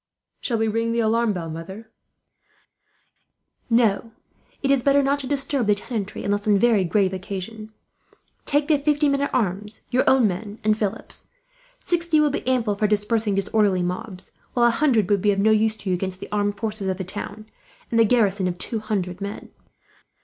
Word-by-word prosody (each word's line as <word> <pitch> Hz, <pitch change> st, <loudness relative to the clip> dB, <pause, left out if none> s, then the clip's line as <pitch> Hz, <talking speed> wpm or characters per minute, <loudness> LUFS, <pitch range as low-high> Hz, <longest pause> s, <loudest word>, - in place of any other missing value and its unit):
"Shall 235 Hz, -, -1 dB
we 225 Hz, 0 st, +1 dB
ring 230 Hz, +1 st, 0 dB
the 235 Hz, -, 0 dB
alarm 230 Hz, 0 st, +2 dB
bell, 175 Hz, -4 st, -4 dB
mother?" 190 Hz, +8 st, -8 dB, 1.8 s
"No; 230 Hz, -1 st, +2 dB, 0.5 s
it 275 Hz, -, +2 dB
is 275 Hz, -2 st, +3 dB
better 280 Hz, +2 st, +3 dB
not 280 Hz, +1 st, +1 dB
to 270 Hz, -, -4 dB
disturb 275 Hz, -4 st, -1 dB
the 210 Hz, -, +4 dB
tenantry, 205 Hz, -1 st, -5 dB
unless 205 Hz, +1 st, -1 dB
on 205 Hz, -1 st, +5 dB
very 220 Hz, -2 st, +3 dB
grave 190 Hz, +2 st, +1 dB
occasion. 200 Hz, +3 st, -6 dB, 0.7 s
Take 290 Hz, 0 st, +1 dB
the 300 Hz, -3 st, +3 dB
fifty 295 Hz, +1 st, +2 dB
men 280 Hz, 0 st, +1 dB
at 280 Hz, -, -1 dB
arms, 210 Hz, -1 st, -2 dB
your 255 Hz, +1 st, +3 dB
own 260 Hz, -4 st, +5 dB
men, 205 Hz, +3 st, -5 dB
and 215 Hz, 0 st, +3 dB
Philip's. 215 Hz, 0 st, -5 dB, 0.6 s
Sixty 335 Hz, -2 st, +2 dB
will 300 Hz, -1 st, +3 dB
be 280 Hz, -, -4 dB
ample 240 Hz, -5 st, +1 dB
for 210 Hz, +1 st, 0 dB
dispersing 210 Hz, 0 st, 0 dB
disorderly 195 Hz, -2 st, +1 dB
mobs; 180 Hz, +1 st, -5 dB, 0.2 s
while 240 Hz, -1 st, +4 dB
a 240 Hz, -, +5 dB
hundred 235 Hz, -7 st, +2 dB
would 200 Hz, -2 st, +3 dB
be 205 Hz, +1 st, +3 dB
of -, -, -4 dB
no 215 Hz, +2 st, +4 dB
use 220 Hz, 0 st, +2 dB
to 205 Hz, -2 st, -6 dB
you, -, -, +2 dB
against 185 Hz, +1 st, -3 dB
the -, -, -8 dB
armed 205 Hz, -1 st, 0 dB
forces 215 Hz, -2 st, -3 dB
of 190 Hz, -1 st, -1 dB
the 190 Hz, -, -4 dB
town 205 Hz, +3 st, -7 dB, 0.5 s
and 230 Hz, -, +2 dB
the -, -, +7 dB
garrison 205 Hz, -5 st, +2 dB
of 175 Hz, -1 st, -3 dB
two 225 Hz, +5 st, -1 dB
hundred 195 Hz, -4 st, -3 dB
men." 200 Hz, +1 st, -6 dB
215 Hz, 190 wpm, -23 LUFS, 200-240 Hz, 1.8 s, the